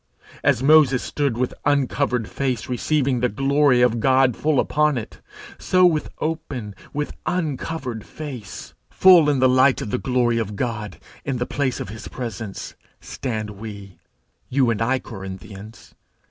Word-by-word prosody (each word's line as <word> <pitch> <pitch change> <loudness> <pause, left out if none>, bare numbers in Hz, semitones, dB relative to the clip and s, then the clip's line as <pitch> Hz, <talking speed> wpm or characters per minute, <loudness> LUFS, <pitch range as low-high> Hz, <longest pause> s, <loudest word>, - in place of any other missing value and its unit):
As 125 - +2
Moses 140 -3 +5
stood 140 -6 -1
with 125 0 -1
uncovered 135 -4 +1
face 130 -4 -2
receiving 130 +1 0
the 125 +1 +1
glory 135 +1 +3
of 120 -1 +2
God 130 0 +3
full 150 -3 +1
upon 150 -2 +2
it, 110 - -7 0.4
so 185 0 +3
with 160 -4 +2
open, 145 -9 -4 0.2
with 150 0 -3
uncovered 145 - -3
face, 130 -9 -8 0.2
full 175 -5 +6
in 145 - +2
the 130 0 +4
light 130 +1 +4
of 105 - -5
the 125 - 0
glory 120 -2 +1
of 105 -2 -3
God, 105 -2 -4 0.3
in 135 -3 -2
the 120 - -1
place 130 -1 -2
of - - -5
his 110 +2 -8
presence, 115 -5 -6 0.3
stand 110 -5 -5
we 100 -2 -10 0.5
you 130 -2 +2
and 115 -1 -2
I, 125 +3 +2
Corinthians. 95 0 -10
125 Hz, 150 wpm, -22 LUFS, 115-145 Hz, 0.5 s, full